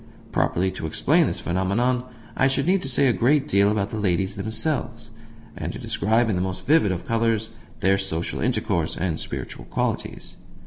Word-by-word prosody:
Properly 95 +2 +1
to 80 - -5
explain 155 - +3
this - - -2
phenomenon 105 +8 0 0.3
I 135 - +3
should 135 +1 0
need 185 +2 +3
to 135 - -3
say 135 +2 +3
a 125 - +4
great 135 +8 +2
deal 100 -3 +4
about 105 0 -1
the 110 - -3
ladies 95 0 0
themselves, 115 +1 -2 0.4
and - - -4
to - - -6
describe 110 +3 +1
in 110 - 0
the 90 - 0
most 95 0 -4
vivid 140 -10 +4
of 90 - -4
colours 115 -1 0 0.3
their 95 +1 +3
social 85 -4 -2
intercourse - - 0
and 80 -2 -1
spiritual - - -6
qualities. - - -3
110 Hz, 180 wpm, -24 LUFS, 95-125 Hz, 0.4 s, a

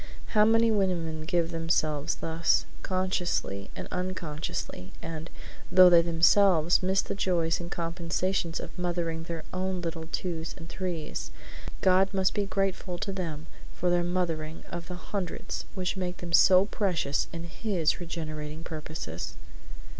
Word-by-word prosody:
How 210 -1 +5
many 225 +1 +5
women 170 -6 0
give 170 -1 +1
themselves 155 -2 0
thus, 165 0 +1 0.2
consciously 180 - -1
and - - -6
unconsciously; 170 - -4
and, 160 0 -6 0.4
though 185 0 +9
they 170 -1 +8
themselves 170 0 +4
miss 190 +1 +2
the - - -3
joys 175 -3 +1
and 170 -1 -6
compensations 170 +1 -1
of - - -8
mothering 170 -2 -1
their 165 -2 -5
own 185 0 -1
little 165 -2 -4
twos 165 -3 -3
and 165 -2 -9
threes, 170 -3 -4 0.5
God 190 +1 +4
must 190 -1 +3
be 205 -1 0
grateful 195 -2 -1
to 195 - -3
them 165 -5 -4 0.3
for 180 0 +1
their 175 0 +3
mothering 165 -3 -2
of 170 -1 -5
the 180 - -5
hundreds 180 0 -4
which 185 -1 -1
make 180 -1 -3
them 170 -1 -7
so 185 +2 +7
precious 180 -9 0
in 170 0 -5
His 170 -2 0
regenerating 155 -2 -5
purposes. 155 - -6
175 Hz, 140 wpm, -29 LUFS, 165-185 Hz, 0.5 s, though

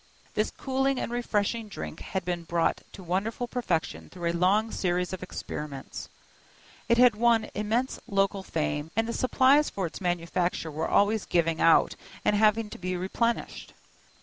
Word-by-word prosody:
This 215 - +1
cooling 270 0 -1
and - - -3
refreshing 230 -2 -1
drink 205 - -7
had 190 -1 -4
been 175 -1 -2
brought 170 0 0
to 190 - -10
wonderful 205 +8 -2
perfection 210 -11 -2
through 175 -2 -2
a - - -6
long 200 +6 +2
series 180 0 -1
of 185 - -5
experiments; 150 -6 -6 0.8
it 235 - +5
had 250 -1 +7
won 230 0 +2
immense 225 +5 -1
local 195 0 +1
fame, 150 -3 -2
and 225 +1 +1
the 235 - -2
supplies 265 +4 +4
for 195 - -3
its 165 - -7
manufacture 175 -1 -1
were 155 +2 -2
always 210 +1 +3
giving 165 -2 +1
out 165 - +5 0.3
and 210 - +3
having 215 +1 +3
to - - -8
be 185 0 -2
replenished. 230 +6 -2
195 Hz, 160 wpm, -28 LUFS, 175-230 Hz, 0.8 s, had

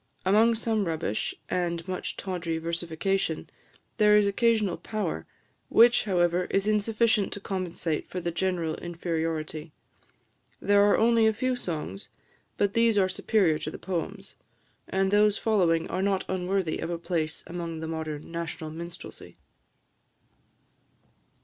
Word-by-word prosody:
Among 220 +4 +5
some 220 -2 0
rubbish, 160 - -2
and 170 -1 -2
much 185 -1 -4
tawdry 175 -4 -3
versification, 170 +2 -2 0.5
there 210 -1 +6
is 210 - +4
occasional 215 -2 +2
power, 175 - -3 0.4
which, 240 0 +6
however, 180 -2 +2
is 195 +2 0
insufficient 215 0 +2
to - - -6
compensate 180 -5 -3
for 185 - -4
the 170 -1 -2
general 175 -2 -1
inferiority. 165 -2 -3 0.9
There 205 0 +4
are 205 0 +5
only 230 0 +4
a 220 - +3
few 255 +4 0
songs, 155 - -5 0.5
but 200 -1 +1
these 230 -2 +3
are 190 -2 +4
superior 185 -4 +2
to 155 - -4
the - - -7
poems; 195 +2 -5 0.5
and 190 0 +1
those 210 0 +4
following 175 -7 +2
are 185 - -2
not 195 -1 +1
unworthy 185 -2 -1
of - - -3
a 170 - -2
place 165 -3 -2
among 170 -2 -5
the 160 - -4
modern 160 -1 -5
national 165 -2 -5
minstrelsy. 170 +2 -9
185 Hz, 135 wpm, -27 LUFS, 165-205 Hz, 0.9 s, there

